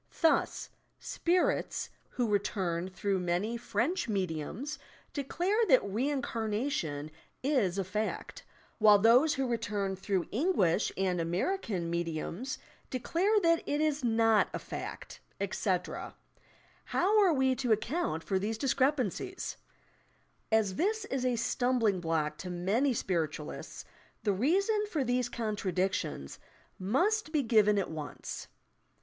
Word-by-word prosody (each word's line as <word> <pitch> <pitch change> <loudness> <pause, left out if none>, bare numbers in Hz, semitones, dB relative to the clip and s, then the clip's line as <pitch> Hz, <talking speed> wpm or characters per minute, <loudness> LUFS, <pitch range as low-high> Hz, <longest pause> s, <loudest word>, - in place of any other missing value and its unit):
Thus, 325 -2 +2 0.3
"spirits" 365 +8 0 0.2
who 245 -2 -1
return 185 -4 0
through 190 +1 -1
many 180 +6 -1
French 245 +6 -1
mediums 195 - -3 0.3
declare 355 - 0
that 260 -8 +5
reincarnation 220 - -2 0.3
is 245 -10 +2
a 195 - +1
fact, 210 +4 -3 0.4
while 210 -1 +8
those 240 +9 +5
who 270 -1 0
return 210 -5 -1
through 190 -1 -1
English 225 - +2
and 185 -2 +1
American 185 - -1
mediums 170 +8 -3 0.3
declare 360 - +1
that 335 -2 +4
it 290 - 0
is 305 -2 +1
not 225 -2 +4
a - - 0
fact; - - -7 0.2
etc. - - -2 0.7
How 415 +4 +3
are 380 -4 +5
we 265 -3 +3
to 250 -4 -1
account 220 - 0
for 190 -2 0
these 215 +3 -2
discrepancies 275 - 0 0.9
I - - +5
As 205 -4 +2
this 435 +5 0
is 265 -1 -2
a 250 -2 +1
stum 250 +2 +1
bling 205 -5 +2
block 155 -2 -1
to 185 - -5
many 195 +10 +1
spiritualists, 160 -7 -3 0.4
the 205 -3 +2
reason 390 - +2
for 305 -8 0
these 245 0 0
contradictions 190 - -2 0.4
must 325 - +1
be 300 -3 +2
given 215 -3 +4
at 195 - -1
once. 155 -2 -6
225 Hz, 125 wpm, -31 LUFS, 190-285 Hz, 0.9 s, while